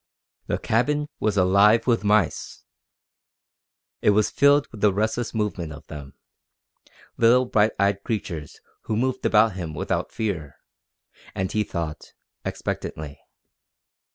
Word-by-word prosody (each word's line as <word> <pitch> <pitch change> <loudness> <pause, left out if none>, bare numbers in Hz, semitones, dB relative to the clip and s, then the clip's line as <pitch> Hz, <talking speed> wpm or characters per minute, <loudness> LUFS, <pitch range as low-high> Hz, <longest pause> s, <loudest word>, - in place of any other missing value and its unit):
The - - 0
cabin 145 +7 0
was 105 -1 0
alive 100 +4 +5
with 115 -3 +2
mice! 105 -1 0 1.4
It - - +3
was 105 +1 +3
filled 140 0 +4
with 110 - -11
the 105 - +5
restless 110 +4 -1
movement 105 -7 -2
of 75 -1 -11
them 70 -3 -10 1.0
little 120 +2 +5
bright 110 -2 +2
eyed 100 0 +1
creatures 85 - -4 0.3
who 110 - -1
moved 130 +2 0
about 110 0 +4
him 85 -4 -6
without - - -2
fear, 85 -11 -3 0.8
and, 95 0 -2
he 110 - +1
thought, 80 -5 -6 0.3
expectantly. 75 -2 -5
105 Hz, 125 wpm, -24 LUFS, 90-115 Hz, 1.4 s, alive